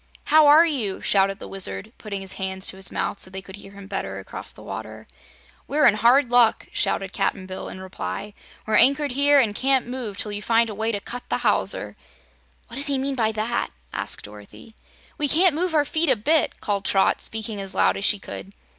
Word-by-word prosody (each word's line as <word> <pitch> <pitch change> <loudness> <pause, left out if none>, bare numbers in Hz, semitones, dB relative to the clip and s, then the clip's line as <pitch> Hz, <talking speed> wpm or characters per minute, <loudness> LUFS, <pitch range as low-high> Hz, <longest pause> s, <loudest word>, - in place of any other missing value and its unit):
"How 310 -1 +5
are 305 +3 +8
you?" 240 - -2
shouted 195 0 +2
the - - -9
Wizard, 195 +3 -3
putting 200 -3 -5
his 190 -1 -5
hands 190 0 -4
to - - -7
his 190 0 +3
mouth - - -3
so - - -1
they 190 +1 -6
could 190 0 -11
hear 195 -1 -13
him 200 0 -11
better - - -4
across - - -5
the - - -13
water. - - -8 0.6
"We're 300 +2 +2
in 225 - +7
hard 240 +4 +3
luck," 240 -2 +4
shouted 195 0 -1
Cap'n 195 -1 -1
Bill, 185 0 -7
in - - -8
reply. 190 +2 -6 0.3
"We're 215 - +2
anchored 280 +1 +4
here 285 +2 +4
and 225 -6 +2
can't 265 +3 +1
move 240 -5 -6
till 210 - -1
you 205 0 -4
find 230 0 +2
a - - -6
way 220 +2 -1
to 205 - -2
cut 245 +4 -9
the - - 0
hawser." - - +1 0.7
"What 235 - -10
does 285 +2 -2
he 280 -1 +1
mean 275 +1 -2
by 225 -4 +1
that?" 220 +3 -2 0.2
asked - - -3
Dorothy. 105 - -13 0.5
"We 295 - +1
can't 340 +4 +4
move 340 +2 -1
our 295 -1 +3
feet 320 +1 0
a 260 - +5
bit!" 300 +9 +1
called 200 -1 -1
Trot, 195 0 +2
speaking 220 -2 -3
as 195 0 +3
loud - - +3
as 195 - -5
she 205 - +2
could. 195 0 -9
220 Hz, 215 wpm, -23 LUFS, 195-275 Hz, 0.7 s, are